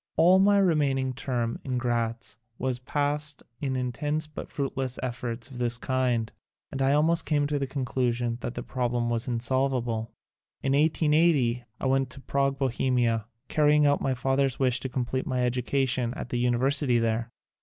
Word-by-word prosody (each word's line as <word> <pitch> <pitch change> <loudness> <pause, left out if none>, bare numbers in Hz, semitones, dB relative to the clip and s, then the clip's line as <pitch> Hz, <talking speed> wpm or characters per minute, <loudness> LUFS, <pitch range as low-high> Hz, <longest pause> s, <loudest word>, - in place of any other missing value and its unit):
All 180 +3 +6
my 200 +1 +5
remaining 145 -8 +2
term 120 -3 -2
in 130 -1 -2
Gratz 115 -2 -2 0.2
was 130 -1 -1
past 145 +2 0 0.2
in 135 -3 -2
intense 145 +5 -1
but 150 - -8
fruit 140 -2 -3
less 130 -1 -2
efforts 120 -1 -4
of 125 - -8
this 120 0 +1
kind, 125 -4 0 0.4
and 135 - -4
I 135 +1 +3
almost 160 +3 +3
came 145 -2 +1
to 145 0 -1
the 135 - -2
conclusion 125 -3 -1
that 120 - -4
the - - -4
problem 120 -2 -1
was 115 +2 -1
in 120 -2 -1
solvable. 120 -3 -1 0.5
In 135 - +1
1880 150 -5 +3
I - - -4
went 135 0 +2
to 135 - -9
Prague, 135 0 0
Bo 135 -1 +1
hemia, 120 -3 +1 0.2
carrying 150 -1 +4
out 145 0 +3
my 135 -1 0
father's 135 +1 +1
wish 130 -1 +2
to 130 - -4
complete 130 +1 -2
my 125 -1 0
education 125 0 0
at - - -6
the 120 - -1
University 125 +2 +3
there. 115 0 0
130 Hz, 175 wpm, -27 LUFS, 120-140 Hz, 0.5 s, All